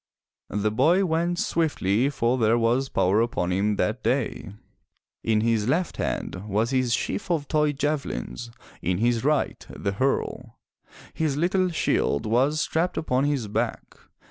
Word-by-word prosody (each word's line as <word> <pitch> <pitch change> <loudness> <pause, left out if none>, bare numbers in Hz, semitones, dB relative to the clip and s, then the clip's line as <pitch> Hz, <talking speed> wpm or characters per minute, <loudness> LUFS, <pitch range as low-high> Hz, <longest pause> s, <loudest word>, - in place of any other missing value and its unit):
The 105 +1 0
boy 165 - +3
went 170 +1 0
swiftly 135 - +1
for 125 -2 0
there 115 +1 +3
was 120 +4 +1
power 100 +4 +2
upon 90 -6 -1
him 100 +3 +1
that - - -1
day. 65 +9 -1 0.7
In 110 -1 +2
his 115 -1 +1
left 170 +5 0
hand 95 +3 -3
was 110 +4 0
his 130 -2 +1
sheaf 185 - -2
of 155 -5 0
toy 150 -1 +2
javelins, 140 -4 -3 0.3
in 90 +1 0
his 115 +2 +1
right 150 +1 0
the 100 - -3
hurle; 125 +1 -2 0.6
his 155 -3 -1
little 185 +3 +2
shield 155 - 0
was 130 +8 +2
strapped 170 +3 -1
upon 130 -3 +1
his 140 -6 -1
back. 105 - -3
125 Hz, 145 wpm, -25 LUFS, 110-155 Hz, 0.7 s, boy